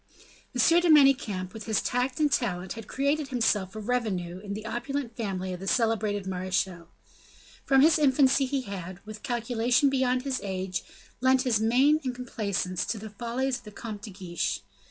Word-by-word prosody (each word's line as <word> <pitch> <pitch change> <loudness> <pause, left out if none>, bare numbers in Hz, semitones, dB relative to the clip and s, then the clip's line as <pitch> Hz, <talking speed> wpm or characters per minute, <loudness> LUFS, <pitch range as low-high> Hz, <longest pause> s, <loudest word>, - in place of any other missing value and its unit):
M. 330 +8 +5
de 350 - +2
Manicamp, 255 - +4
with 220 -2 -8
his 220 -1 +1
tact 250 +2 -1
and 300 -2 +3
talent 185 -8 -1
had 225 -2 -9
created 280 +2 0
himself 220 -6 0
a - - -4
revenue 205 -7 -2
in 200 0 -6
the 215 +1 -7
opulent 240 +1 -3
family 190 -5 -3
of 180 - -6
the 195 - -7
celebrated 215 -3 +1
marechal. 185 -2 -2 0.8
From 270 -1 +5
his 315 +2 +5
infancy 270 -1 +4
he 275 0 -1
had, 190 -5 -7
with 215 0 -9
calculation 245 +1 +1
beyond 255 -1 +1
his 270 -2 -2
age, 190 -2 -3 0.4
lent 260 0 +3
his 240 -5 +2
mane 260 +7 +4
and 255 -2 -3
complaisance 200 -7 -2
to 230 - -2
the 215 0 -8
follies 240 +4 -2
of - - -23
the 210 - -10
Comte 210 -1 -7
de 210 - -8
Guiche. 180 - -3
230 Hz, 175 wpm, -27 LUFS, 195-260 Hz, 0.8 s, M